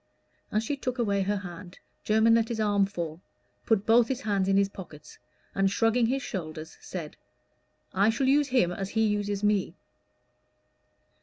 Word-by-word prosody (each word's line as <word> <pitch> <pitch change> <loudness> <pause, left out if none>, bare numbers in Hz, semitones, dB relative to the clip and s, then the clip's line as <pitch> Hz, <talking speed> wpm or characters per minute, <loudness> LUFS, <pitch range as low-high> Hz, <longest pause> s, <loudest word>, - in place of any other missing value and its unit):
As 215 +1 0
she 285 +6 -2
took 255 -1 -3
away 200 -5 +1
her 205 +2 0
hand, 180 -1 -9 0.3
Jermyn 220 +1 +4
let 230 -1 +3
his 230 -2 -3
arm 205 -2 +2
fall, 170 -3 -5 0.5
put 215 -3 +2
both 230 +1 +5
his 265 +1 -3
hands 200 -5 0
in 195 0 +3
his 200 0 +3
pockets, 180 -6 -12 0.3
and 195 0 +2
shrugging 225 +3 +2
his 265 +2 -1
shoulders 160 -6 -6
said, 165 -5 -7 0.8
"I 200 +3 +3
shall 245 +4 0
use 285 +1 +3
him 245 -10 +2
as 195 +2 -4
he 220 +1 +1
uses 205 -1 -1
me." 205 -2 +1
205 Hz, 165 wpm, -27 LUFS, 190-225 Hz, 0.8 s, both